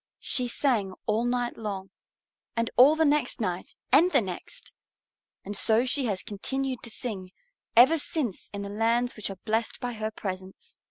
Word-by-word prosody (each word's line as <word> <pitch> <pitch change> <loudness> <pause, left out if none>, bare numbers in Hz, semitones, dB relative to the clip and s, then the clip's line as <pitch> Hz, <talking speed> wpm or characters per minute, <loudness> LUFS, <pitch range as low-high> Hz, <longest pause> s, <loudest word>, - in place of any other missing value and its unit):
she 250 -1 +1
sang 230 -7 0
all 220 +2 +1
night 245 0 -1
long, 195 -3 -5 0.6
and 230 0 0
all 270 +5 +7
the 320 0 +3
next 295 0 +1
night - - -3 0.2
and 355 - +6
the 285 - +4
next. 210 - -7 0.7
And 205 +1 -5
so 225 +4 +4
she 260 +1 0
has 200 -5 -2
continued 260 +5 -3
to 235 - -6
sing 205 -5 -5 0.5
ever 265 +8 +7
since 275 - -2
in 200 0 -5
the 200 - -5
lands 230 +4 +1
which 215 - -2
are 195 - -7
blessed 225 +1 -1
by 245 0 -3
her 215 -1 -3
presence. 190 -3 -7
230 Hz, 170 wpm, -27 LUFS, 205-255 Hz, 0.7 s, all